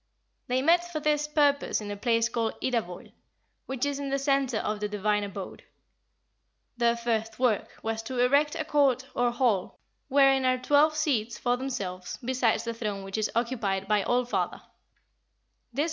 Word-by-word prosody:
They 255 Hz, +1 st, 0 dB
met 345 Hz, +3 st, +3 dB
for 310 Hz, -, -2 dB
this 300 Hz, 0 st, +1 dB
purpose 290 Hz, -2 st, +2 dB
in 210 Hz, -1 st, -6 dB
a -, -, -3 dB
place 230 Hz, +2 st, +1 dB
called 230 Hz, -1 st, -2 dB
Idavoll, 225 Hz, -9 st, -3 dB, 0.6 s
which 265 Hz, 0 st, -2 dB
is 285 Hz, -1 st, -2 dB
in 280 Hz, -1 st, -3 dB
the 275 Hz, -, +1 dB
centre 275 Hz, -3 st, +1 dB
of 215 Hz, 0 st, -2 dB
the 210 Hz, 0 st, -2 dB
divine 210 Hz, 0 st, 0 dB
abode. 195 Hz, -1 st, -7 dB, 1.1 s
Their 235 Hz, -1 st, +2 dB
first 225 Hz, -2 st, -2 dB
work 245 Hz, -5 st, +1 dB
was 225 Hz, 0 st, -2 dB
to 255 Hz, +2 st, -5 dB
erect 280 Hz, +5 st, +3 dB
a 315 Hz, -, -3 dB
court 275 Hz, -4 st, +2 dB
or 245 Hz, 0 st, +2 dB
hall 240 Hz, -6 st, 0 dB, 0.3 s
wherein 270 Hz, -1 st, +4 dB
are 255 Hz, 0 st, +3 dB
twelve 290 Hz, +4 st, +3 dB
seats 240 Hz, -7 st, 0 dB
for 245 Hz, 0 st, +1 dB
themselves, 205 Hz, -9 st, -5 dB
besides 250 Hz, -3 st, +1 dB
the 230 Hz, 0 st, -3 dB
throne 210 Hz, -4 st, -4 dB
which 195 Hz, +2 st, -4 dB
is 215 Hz, -, 0 dB
occupied 225 Hz, -5 st, -1 dB
by 210 Hz, 0 st, +3 dB
All 245 Hz, +5 st, +1 dB
father. 245 Hz, -, -2 dB
245 Hz, 165 wpm, -28 LUFS, 215-275 Hz, 1.1 s, wherein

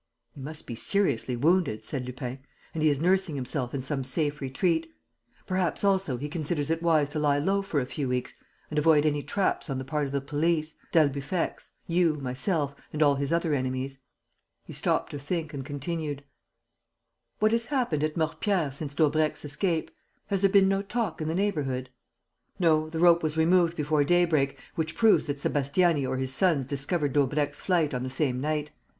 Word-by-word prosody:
"He 140 Hz, -, -12 dB
must 150 Hz, +3 st, -7 dB
be -, -, -6 dB
seriously 125 Hz, -, +1 dB
wounded," 140 Hz, -6 st, +1 dB
said 130 Hz, -4 st, -4 dB
Lupin, 125 Hz, +1 st, -5 dB, 0.3 s
"and 160 Hz, -, -3 dB
he 155 Hz, -, +5 dB
is 145 Hz, -2 st, +1 dB
nursing 180 Hz, -1 st, +1 dB
himself 130 Hz, -1 st, -2 dB
in 135 Hz, -2 st, -3 dB
some 135 Hz, 0 st, -1 dB
safe 145 Hz, +3 st, 0 dB
retreat. 175 Hz, -, 0 dB, 0.5 s
Perhaps, 185 Hz, -2 st, -1 dB
also, 190 Hz, -9 st, +2 dB
he 145 Hz, +4 st, -4 dB
considers 150 Hz, -1 st, -2 dB
it 165 Hz, 0 st, 0 dB
wise 160 Hz, -4 st, +3 dB
to 150 Hz, -, -3 dB
lie 145 Hz, -1 st, +2 dB
low 195 Hz, +7 st, +1 dB
for 195 Hz, -7 st, -1 dB
a 130 Hz, -, -1 dB
few 135 Hz, 0 st, -3 dB
weeks 125 Hz, 0 st, -2 dB, 0.4 s
and 150 Hz, -, +1 dB
avoid 150 Hz, -1 st, +4 dB
any 145 Hz, -1 st, +1 dB
traps 190 Hz, 0 st, -1 dB
on 135 Hz, -, -2 dB
the 130 Hz, -, -5 dB
part 150 Hz, +1 st, -1 dB
of -, -, -7 dB
the 140 Hz, -, 0 dB
police, 155 Hz, +3 st, 0 dB, 0.2 s
d'Albufex, 145 Hz, +2 st, 0 dB, 0.2 s
you, 170 Hz, -2 st, +2 dB
myself 140 Hz, +3 st, -1 dB, 0.2 s
and 155 Hz, 0 st, +1 dB
all 145 Hz, -1 st, +5 dB
his 140 Hz, +1 st, -2 dB
other 165 Hz, -2 st, +1 dB
enemies." 130 Hz, 0 st, -2 dB, 0.7 s
He -, -, -9 dB
stopped -, -, 0 dB
to 145 Hz, -, -5 dB
think 155 Hz, +2 st, -3 dB
and 135 Hz, -2 st, -4 dB
continued: 145 Hz, +1 st, -4 dB, 1.1 s
"What 215 Hz, +1 st, +3 dB
has 230 Hz, 0 st, +1 dB
happened 240 Hz, -, 0 dB
at 155 Hz, 0 st, -1 dB
Mortepierre 160 Hz, 0 st, 0 dB
since 140 Hz, +1 st, -6 dB
Daubrecq's 155 Hz, 0 st, +1 dB
escape? 160 Hz, +3 st, -1 dB, 0.4 s
Has 195 Hz, -2 st, 0 dB
there 195 Hz, -, +5 dB
been 195 Hz, -1 st, +5 dB
no 195 Hz, 0 st, +1 dB
talk 205 Hz, -4 st, -3 dB
in 155 Hz, -, -2 dB
the 160 Hz, -, -1 dB
neighbourhood?" 140 Hz, -10 st, -1 dB, 0.7 s
"No, 155 Hz, -3 st, +2 dB
the 160 Hz, -, -5 dB
rope 170 Hz, 0 st, +5 dB
was 155 Hz, 0 st, -1 dB
removed 170 Hz, +1 st, +3 dB
before 150 Hz, -1 st, +2 dB
daybreak, 155 Hz, -4 st, +2 dB, 0.2 s
which 160 Hz, -1 st, -2 dB
proves 225 Hz, -7 st, +4 dB
that 145 Hz, -1 st, -2 dB
Sébastiani 145 Hz, +1 st, +1 dB
or 130 Hz, -, -1 dB
his 130 Hz, 0 st, +1 dB
sons 160 Hz, -4 st, +2 dB
discovered 140 Hz, +2 st, -1 dB
Daubrecq's 145 Hz, +1 st, +1 dB
flight 170 Hz, -6 st, +1 dB
on 125 Hz, -, -2 dB
the 130 Hz, -, -3 dB
same 130 Hz, -1 st, 0 dB
night. 150 Hz, 0 st, -2 dB
150 Hz, 185 wpm, -27 LUFS, 140-170 Hz, 1.1 s, he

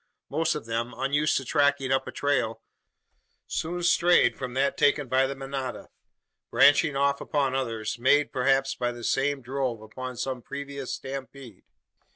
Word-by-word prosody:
Most 160 Hz, +3 st, +1 dB
of 150 Hz, -, -5 dB
them, 115 Hz, +1 st, -3 dB
unused 145 Hz, +4 st, +1 dB
to 135 Hz, -, -3 dB
tracking 140 Hz, -1 st, +2 dB
up 135 Hz, -, +1 dB
a -, -, -5 dB
trail, 115 Hz, -6 st, -1 dB, 0.8 s
soon 175 Hz, +2 st, -3 dB
strayed 175 Hz, -5 st, +4 dB
from 130 Hz, -2 st, -6 dB
that 140 Hz, +1 st, +1 dB
taken 145 Hz, -1 st, +2 dB
by 130 Hz, +2 st, +3 dB
the 140 Hz, -, -4 dB
manada; 135 Hz, -1 st, -5 dB, 0.6 s
branching 145 Hz, 0 st, +5 dB
off 140 Hz, 0 st, +1 dB
upon 140 Hz, -3 st, 0 dB
others, 115 Hz, -4 st, -2 dB
made, 145 Hz, +4 st, +3 dB
perhaps, 135 Hz, +1 st, +2 dB
by 120 Hz, -1 st, -2 dB
the 120 Hz, -1 st, -9 dB
same 135 Hz, +2 st, 0 dB
drove 130 Hz, -2 st, -2 dB
upon 125 Hz, +4 st, -7 dB
some 130 Hz, -1 st, -3 dB
previous 140 Hz, 0 st, -6 dB
stampede. 135 Hz, -4 st, -8 dB
135 Hz, 155 wpm, -27 LUFS, 125-140 Hz, 0.8 s, branching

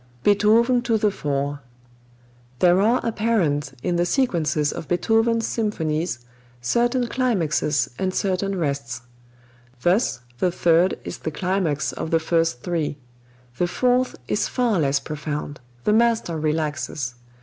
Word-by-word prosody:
Beethoven 225 Hz, +5 st, +4 dB
to 230 Hz, -2 st, +1 dB
the 210 Hz, -1 st, +2 dB
Fore. 145 Hz, -3 st, -2 dB, 1.0 s
There 180 Hz, +5 st, +4 dB
are 230 Hz, +5 st, +3 dB
apparent 175 Hz, -, 0 dB
in 175 Hz, -, 0 dB
the 175 Hz, -, +2 dB
sequences 160 Hz, -, +1 dB
of -, -, -7 dB
Beethoven's 225 Hz, +5 st, +2 dB
symphonies 160 Hz, -, -2 dB, 0.3 s
certain 240 Hz, -, +1 dB
climaxes 175 Hz, -, +1 dB
and 190 Hz, -1 st, 0 dB
certain 195 Hz, +1 st, -1 dB
rests. 140 Hz, -7 st, -2 dB, 0.8 s
Thus 180 Hz, -, +2 dB, 0.2 s
the 180 Hz, -, +2 dB
Third 170 Hz, +1 st, +3 dB
is -, -, -6 dB
the -, -, -3 dB
climax 175 Hz, -3 st, -1 dB
of -, -, -4 dB
the 165 Hz, -, +3 dB
first 165 Hz, -5 st, 0 dB
three. 160 Hz, -5 st, -2 dB, 0.6 s
The 175 Hz, -, +2 dB
Fourth 250 Hz, +7 st, +1 dB
is -, -, 0 dB
far 240 Hz, -7 st, +1 dB
less 140 Hz, -2 st, +2 dB
profound; 150 Hz, 0 st, -5 dB, 0.2 s
the 210 Hz, -, +2 dB
master 230 Hz, -6 st, +2 dB
relaxes. 150 Hz, -4 st, -2 dB
175 Hz, 125 wpm, -23 LUFS, 150-220 Hz, 1.0 s, Beethoven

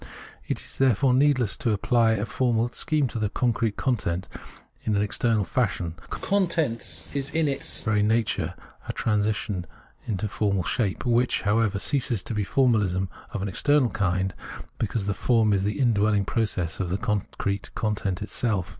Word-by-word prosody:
It -, -, -2 dB
is -, -, -11 dB
therefore 130 Hz, 0 st, +4 dB
needless 130 Hz, -5 st, +3 dB
to 115 Hz, -, +1 dB
apply 115 Hz, +2 st, +3 dB
a 105 Hz, -1 st, -1 dB
formal 120 Hz, -1 st, +1 dB
scheme 150 Hz, +3 st, 0 dB
to 115 Hz, -, -4 dB
the 105 Hz, -2 st, 0 dB
concrete 115 Hz, -2 st, 0 dB
content 95 Hz, -8 st, -1 dB, 0.5 s
in 105 Hz, -, 0 dB
an 100 Hz, -, +2 dB
external 110 Hz, +1 st, +1 dB
fashion; 95 Hz, -7 st, -1 dB, 0.2 s
the -, -, -4 dB
content 160 Hz, -, 0 dB
is 140 Hz, -1 st, 0 dB
in 160 Hz, -1 st, +1 dB
its 135 Hz, -1 st, 0 dB
very 110 Hz, -2 st, +2 dB
nature 110 Hz, +1 st, 0 dB, 0.3 s
a -, -, -3 dB
transition 105 Hz, -4 st, -1 dB, 0.4 s
into 105 Hz, -2 st, -2 dB
a -, -, 0 dB
formal 100 Hz, -2 st, 0 dB
shape, 95 Hz, +7 st, -1 dB
which, 120 Hz, +1 st, +2 dB
however, 105 Hz, -1 st, +2 dB
ceases 120 Hz, -, 0 dB
to -, -, -4 dB
be 105 Hz, -1 st, 0 dB
formahsm 100 Hz, -6 st, +2 dB, 0.2 s
of 95 Hz, -, -4 dB
an -, -, -1 dB
external 140 Hz, +6 st, +2 dB
kind, 95 Hz, -2 st, 0 dB, 0.5 s
because 110 Hz, -1 st, -1 dB
the 100 Hz, -, 0 dB
form 110 Hz, 0 st, +2 dB
is 95 Hz, -1 st, +1 dB
the 105 Hz, +7 st, -2 dB
indwelling 105 Hz, -5 st, +2 dB
process 95 Hz, -9 st, -1 dB
of 95 Hz, -3 st, -1 dB
the 95 Hz, -, 0 dB
con 105 Hz, -2 st, 0 dB, 0.2 s
crete 100 Hz, 0 st, -2 dB
content 100 Hz, -4 st, -1 dB
itself. 105 Hz, -6 st, -1 dB
110 Hz, 170 wpm, -25 LUFS, 100-120 Hz, 0.5 s, therefore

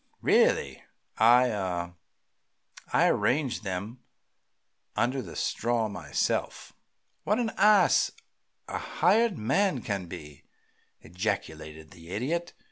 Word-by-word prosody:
Really, -, -, +2 dB, 0.4 s
I 120 Hz, +3 st, +6 dB
ah 90 Hz, -4 st, -3 dB, 1.0 s
I -, -, +4 dB
arranged 135 Hz, -2 st, 0 dB
them 100 Hz, +5 st, -5 dB, 1.0 s
under 130 Hz, +2 st, 0 dB
the -, -, -10 dB
straw 115 Hz, -1 st, -1 dB
myself." 85 Hz, -8 st, -2 dB, 0.5 s
"What 210 Hz, -, +1 dB
an 235 Hz, -2 st, -1 dB
ass 210 Hz, -3 st, +4 dB, 0.6 s
a -, -, -4 dB
hired 225 Hz, -5 st, +2 dB
man 135 Hz, -, +1 dB
can 100 Hz, -3 st, -3 dB
be!" 75 Hz, -3 st, -10 dB, 0.6 s
ejaculated 80 Hz, -4 st, -5 dB
the 85 Hz, 0 st, -14 dB
Idiot. 155 Hz, -, -2 dB
110 Hz, 100 wpm, -28 LUFS, 90-135 Hz, 1.0 s, I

